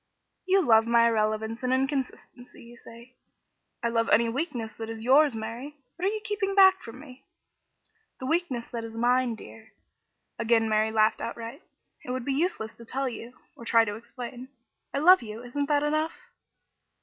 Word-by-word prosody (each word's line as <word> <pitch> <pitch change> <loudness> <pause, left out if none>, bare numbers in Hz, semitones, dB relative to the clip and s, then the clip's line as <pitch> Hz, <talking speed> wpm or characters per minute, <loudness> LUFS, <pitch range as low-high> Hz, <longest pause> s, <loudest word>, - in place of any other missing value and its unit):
"You 380 0 +4
love 225 -4 +4
my 235 0 +4
irrelevance 220 0 -1
and 255 0 -1
inconsistency, 260 -2 -3
you 235 +1 -14
say, 235 +2 -15 0.4
" - - -49
"I 235 - +1
love 230 0 0
any 230 +2 +4
weakness 240 -4 -4
that 225 0 -6
is 225 -1 -7
yours, 275 +1 +4
Mary. 235 +7 -6 0.2
What 355 - -4
are - - +1
you 435 - -3
keeping 415 -2 -2
back 380 -1 +6
from 230 +2 -10
me?" 260 -2 -13 1.0
"The 260 - -6
weakness 275 -6 -1
that 235 -1 -5
is 225 0 -8
mine, 245 +1 +1
dear." 220 0 -14 0.7
Again 230 -1 +2
Mary 215 0 +1
laughed 215 0 +2
outright. 230 0 -6 0.4
"It - - -10
would 255 -1 -3
be 275 - 0
useless 275 -8 -2
to 235 - -12
tell 270 +3 -2
you 240 0 -7 0.2
or - - -12
to - - -6
try 230 -1 +5
to 205 - -4
explain. 245 +3 -9 0.4
I - - -3
love 360 +6 +6
you, 225 0 -8
isn't 280 +4 -3
that 290 -1 +2
enough?" 310 +2 -1
240 Hz, 185 wpm, -27 LUFS, 225-280 Hz, 1.0 s, back